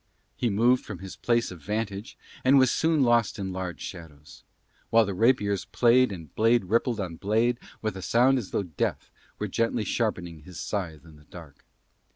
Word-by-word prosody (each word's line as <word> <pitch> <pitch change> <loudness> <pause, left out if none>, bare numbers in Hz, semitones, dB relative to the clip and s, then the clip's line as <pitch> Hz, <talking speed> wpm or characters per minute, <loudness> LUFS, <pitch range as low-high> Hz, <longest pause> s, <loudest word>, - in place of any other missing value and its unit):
He 120 - 0
moved 120 +5 +3
from 110 - -7
his 95 +1 -9
place 120 -3 0
of 90 -3 -10
vantage 105 +4 -4 0.3
and 135 +2 +5
was 130 -2 +5
soon 160 -3 +2
lost 120 -3 +2
in 95 -2 -4
large 90 -1 -5
shadows; 75 -5 -10 0.5
while 115 0 +5
the 100 - -3
rapiers 100 -2 +2
played 125 0 +3
and 80 -6 -9
blade 115 -1 +3
rippled 115 +3 +1
on 90 -4 -4
blade 115 +6 +1 0.2
with 110 -2 -2
a 95 - -6
sound 125 +7 +3
as 100 -7 -7
though - - -1
Death 85 -5 -3 0.3
were - - -3
gently 115 0 0
sharpening 90 -9 -2
his 85 +3 -11
scythe 85 -7 -4
in 80 -2 -15
the 75 - -20
dark. 75 -5 -13
105 Hz, 185 wpm, -27 LUFS, 90-120 Hz, 0.5 s, and